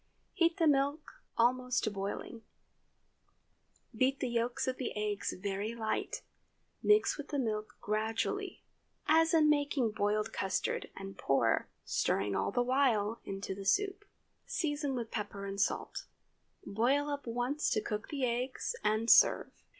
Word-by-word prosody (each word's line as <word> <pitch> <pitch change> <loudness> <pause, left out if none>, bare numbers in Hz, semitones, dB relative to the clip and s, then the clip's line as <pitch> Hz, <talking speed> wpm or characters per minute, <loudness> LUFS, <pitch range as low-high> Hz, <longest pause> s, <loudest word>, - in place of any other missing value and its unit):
Heat 335 -2 +2
the 335 - +3
milk 290 +1 +1 0.2
almost 250 +1 +2
to 215 - 0
boiling; 200 +3 -5 1.5
beat 260 +4 +2
the 255 - -1
yolks 235 +1 -1
of 255 - -1
the 255 - -3
eggs 210 -1 -1
very 200 +4 -3
light; 220 -2 -2 0.6
mix 420 -5 +4
with 295 - -5
the 290 - -3
milk 215 -4 -2
gradually, 225 - -2 0.4
as 325 +1 +4
in 315 -2 +5
making 285 -5 +2
boiled 210 0 0
custard, 190 -1 -1
and 195 -1 -8
pour—stirring 115 -5 0
all - - 0
the 245 +4 +1
while—into 220 -7 0
the 195 +1 -7
soup. 395 - +1 0.4
Season 290 -4 -1
with 235 -2 -4
pepper 200 -2 -4
and 200 0 -2
salt; - - -1 0.6
boil 260 +8 +1
up 285 -3 -4
once 245 +6 0
to - - +2
cook 210 0 -4
the 275 -3 -1
eggs, 250 +2 -2
and 215 +2 +1
serve. - - +6
240 Hz, 135 wpm, -33 LUFS, 210-285 Hz, 1.5 s, serve